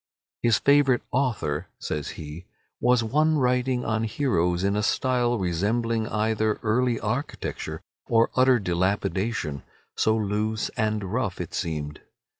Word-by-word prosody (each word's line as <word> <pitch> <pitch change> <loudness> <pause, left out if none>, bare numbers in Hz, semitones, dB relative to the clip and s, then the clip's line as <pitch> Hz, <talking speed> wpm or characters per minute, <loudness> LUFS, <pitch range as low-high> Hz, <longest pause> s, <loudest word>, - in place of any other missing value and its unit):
"His 115 -4 +4
favourite 140 -3 +4
author," 115 - -1
says 75 -2 -4
he, 80 +3 -8 0.3
"was 125 -1 +3
one 155 +7 +2
writing 125 -1 +1
on 110 0 0
heroes 90 -8 0
in 100 +1 +1
a 105 - +1
style 120 +2 +1
resembling 110 +5 0
either 110 -1 0
early 120 +2 +1
architecture 120 +7 -4 0.3
or 115 -1 +3
utter 130 0 +5
dilapidation, 95 - -1 0.3
so 110 0 +2
loose 110 +1 -1
and 110 -3 -1
rough 115 -7 -1
it 90 - -5
seemed. 75 -4 -3
110 Hz, 125 wpm, -25 LUFS, 95-125 Hz, 0.3 s, utter